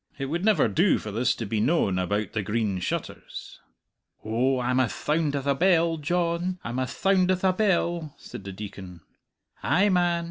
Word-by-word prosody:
"It 135 - -3
would 165 +6 -2
never 210 -7 +4
do 180 +4 +3
for 105 - -6
this 115 +5 +1
to 115 - -4
be 105 +1 -1
known 110 - +2
about 100 +2 -1
the 110 - 0
'Green 105 -2 -1
Shutters.'" 90 - -5 0.7
"Oh, 125 +4 +1
I'm 125 +1 +1
ath 125 -4 +2
thound 150 -1 0
ath 140 -1 -3
a 140 - +3
bell, 170 +1 +3
Dyohn, 175 +3 -1
I'm 120 +2 -3
ath 130 - -2
thound 190 -2 +2
ath 185 0 +1
a 190 -1 +4
bell," 175 -6 0
said - - -10
the 100 - -6
Deacon. 95 -3 -9 0.6
"Ay, 185 +9 +3
man! 175 -2 +2
140 Hz, 185 wpm, -26 LUFS, 110-175 Hz, 0.7 s, never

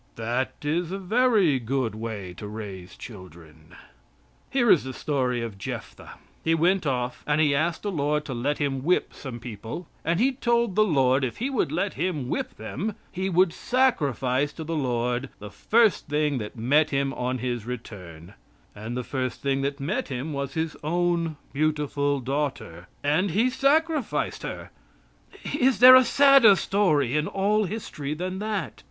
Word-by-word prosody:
That 120 +3 -2
is 165 +3 -1
a 195 - -2
very 200 - +2
good 125 -1 -1
way 110 -4 -6
to 105 - -7
raise 100 -4 -8
children. 85 -5 -13 0.7
Here 240 -4 +3
is 160 - +5
the 130 0 -6
story 125 -5 -1
of 105 -4 -7
Jephthah. - - -7 0.3
He 165 0 +2
went 175 +1 +2
off 125 -2 -2
and 150 0 +2
he 150 -2 +3
asked 160 +4 0
the 205 - -2
Lord 150 -2 0
to 135 - -5
let 135 +5 -1
him 135 -2 -2
whip 180 +4 +1
some 125 -4 -8
people, 115 - -7 0.2
and 165 +2 0
he 260 +4 +3
told 235 -4 +1
the 215 +3 +4
Lord 135 -7 +2
if 125 - -2
He 260 +5 -2
would 265 - 0
let 200 0 -1
him 150 -5 -2
whip - - -3
them, 175 - -4 0.2
he 190 +1 -2
would 180 -1 +3
sacrifice 145 - +1
to 160 - -7
the 165 +1 -3
Lord 125 -2 -1
the 105 -1 -10
first 220 - +2
thing 150 -2 0
that 105 +1 -7
met 145 +7 +3
him 135 -1 0
on 125 +1 -2
his 120 -2 -3
return; 95 -8 -8 0.4
and 110 +4 -5
the 125 - -2
first 130 -1 -3
thing 135 -1 0
that 140 +1 -2
met 190 - -2
him 135 +3 -4
was 140 +1 -4
his 160 -1 -2
own 170 -1 0 0.2
beautiful 145 -1 0
daughter, 130 - -4 0.2
and 155 +7 +2
he 225 +9 +2
sacrificed 300 0 +1
her. - - -7 0.8
Is 265 -4 +2
there 255 +1 +10
a 255 - +8
sadder 275 -4 +6
story 155 - +1
in 150 0 +1
all 205 +2 +1
history 155 -8 -5
than 185 +3 -4
that? 210 -1 -3
145 Hz, 170 wpm, -25 LUFS, 125-185 Hz, 0.8 s, there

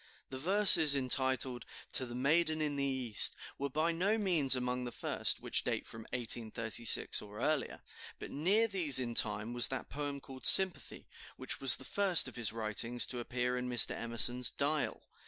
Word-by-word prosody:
The 130 - -8
verses 180 -3 +6
entitled, 130 -1 -2 0.3
"To 130 - 0
the 120 - -11
Maiden 155 +5 -1
in 150 -2 -4
the 140 - -4
East," 130 -6 +3 0.2
were 140 +1 -5
by 155 +5 -3
no 190 +6 -3
means 170 -11 +1
among 125 0 -5
the 120 - -8
first, - - -2
which - - -3
date - - -5
from 115 -1 -13
1836 115 -1 -1
or 105 +1 -14
earlier; 150 +1 -4 0.4
but - - -12
near 200 +10 -1
these 175 - -1
in 120 -2 -3
time 105 +1 -1
was 120 -1 +1
that - - -8
poem 145 0 -7
called 135 -1 -2
"Sympathy," 190 -2 +5 0.3
which - - -6
was - - +3
the - - -11
first 195 -4 +3
of - - -12
his 115 -3 -2
writings 115 +2 +1
to 125 - -9
appear 125 +1 -5
in 125 0 -6
Mr. 120 -2 +5
Emerson's 115 +2 +2
"Dial." 145 +1 -5
130 Hz, 175 wpm, -30 LUFS, 120-155 Hz, 0.4 s, verses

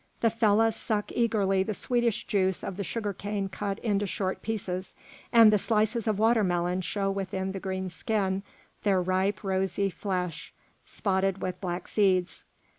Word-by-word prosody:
The 230 - +4
fellahs 225 0 +3
suck 210 -2 -2
eagerly 205 -5 +2
the 205 +2 -2
sweetish 240 -1 0
juice 190 -2 +1
of 195 - -4
the 200 - -3
sugar 210 0 -3
cane 200 0 -3
cut 200 +1 -3
into 205 -2 0
short 190 0 -2
pieces, 190 -4 -4 0.4
and 225 -3 +8
the 210 - +4
slices 220 +2 +1
of 215 -2 +1
watermelon 185 -5 +2
show 195 +1 -1
within 190 -1 -3
the 195 - -5
green 190 -1 -3
skin 190 +2 -1 0.4
their 195 -3 +3
ripe, 185 +3 0
rosy, 195 0 0
flesh, 180 -5 -4 0.3
spotted 195 -1 0
with 185 -1 -3
black 180 -2 -3
seeds. 185 -4 +1
195 Hz, 155 wpm, -28 LUFS, 190-215 Hz, 0.4 s, and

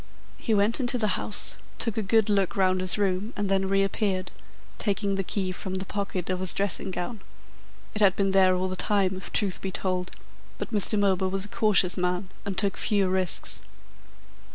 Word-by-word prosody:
He 225 - 0
went 210 +5 +3
into 250 -1 +2
the 215 -3 0
house, 205 +2 -2 0.2
took 230 -3 -1
a 220 - 0
good 220 +1 +2
look 200 -3 +1
round 185 -1 +2
his 185 +2 +1
room, 200 +3 -1
and 205 -1 -1
then 195 0 +1
reappeared, 195 -1 0 0.5
taking 200 -1 0
the 195 0 -1
key 190 0 -1
from 185 +1 -5
the 190 +1 -3
pocket 195 -3 -3
of 185 - -1
his 185 -1 -1
dressing 200 -1 +1
gown. 185 +5 -4 0.7
It 210 - -1
had 195 -2 +5
been 195 -1 +1
there 190 -1 +5
all 185 +1 -1
the 185 - -3
time, 190 0 +2
if 185 - -8
the - - -1
truth 200 -3 0
be 195 - -3
told, 185 -2 -1 0.5
but - - -5
Mr. 210 0 +1
Milburgh 190 -2 +2
was 195 0 +3
a - - -9
cautious 200 -5 +3
man 180 +1 -1 0.2
and 195 - -3
took 200 -2 +2
few 200 -3 +1
risks. 185 -1 0
195 Hz, 200 wpm, -26 LUFS, 185-205 Hz, 0.7 s, had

